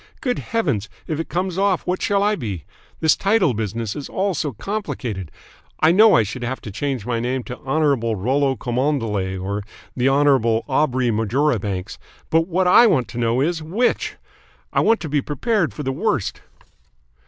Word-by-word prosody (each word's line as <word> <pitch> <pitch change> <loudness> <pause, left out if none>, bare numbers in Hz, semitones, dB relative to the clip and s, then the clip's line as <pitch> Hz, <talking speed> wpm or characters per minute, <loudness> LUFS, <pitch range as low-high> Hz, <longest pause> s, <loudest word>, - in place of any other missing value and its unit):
Good 250 -2 -1
Heavens, 140 - -1 0.2
if 155 -1 -3
it 165 - -4
comes 185 +1 -2
off, 195 -2 +1
what 180 +1 -1
shall 200 -1 +2
I 210 +1 +2
be? 100 - -5 0.4
This 160 - +4
title 195 - +2
business 110 0 -3
is 145 - -6
all 195 0 0
so 150 -2 -2
complicated. 120 - -4 0.5
I 160 - +5
know 215 +4 +6
I 115 - +5
should 120 +4 -6
have 125 +2 -3
to 105 - -7
change 130 0 -3
my 120 -2 -1
name 125 +2 -2
to 125 - -8
Hon. 145 -1 +1 0.2
Rollo 135 +7 +1
Cholmondeley 120 -8 -1
or 100 +3 -3 0.3
the 130 +1 +2
Hon. 145 +2 +3 0.4
Aubrey 130 -3 +1
Marjoribanks, 110 -4 -1 0.3
but 165 +1 +3
what 185 +1 +1
I 235 +6 +7
want 130 - +1
to 120 - -6
know 115 +2 +1
is 160 +2 0
which? 195 +11 0 0.6
I - - +3
want 225 0 +3
to 165 - -4
be 145 -1 +1
prepared 180 - 0
for 150 - -6
the 135 - -1
worst." 155 - -1
140 Hz, 175 wpm, -21 LUFS, 115-180 Hz, 0.6 s, I